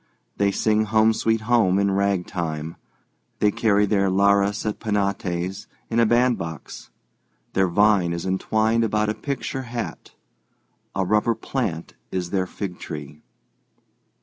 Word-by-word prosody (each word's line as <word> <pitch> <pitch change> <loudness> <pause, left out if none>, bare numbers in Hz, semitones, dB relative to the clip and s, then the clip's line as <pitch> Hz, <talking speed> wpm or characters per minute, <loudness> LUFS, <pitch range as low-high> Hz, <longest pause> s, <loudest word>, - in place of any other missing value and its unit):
They 100 0 +3
sing 110 +2 +1
"Home, 110 +1 +3
Sweet 115 0 0
Home" 110 -5 +3
in 100 0 +2
ragtime; 90 -5 -1 0.6
they 105 - +3
carry 105 -1 +2
their 100 -2 +2
lares 100 +2 +2
et 105 - -2
penates 95 -3 -2 0.2
in 115 - +2
a 115 - +5
bandbox; 120 -10 -1 0.6
their 95 -1 +3
vine 100 -1 +3
is 85 +1 -4
entwined 110 +4 +1
about 105 -1 +1
a - - +1
picture 135 +3 -4
hat; 120 -2 -6 0.8
a 95 -1 0
rubber 105 +4 +2
plant 90 -12 -3 0.2
is 90 -2 -3
their 95 -2 0
fig 90 -2 -6
tree. 75 -1 -8
100 Hz, 130 wpm, -23 LUFS, 95-110 Hz, 0.8 s, a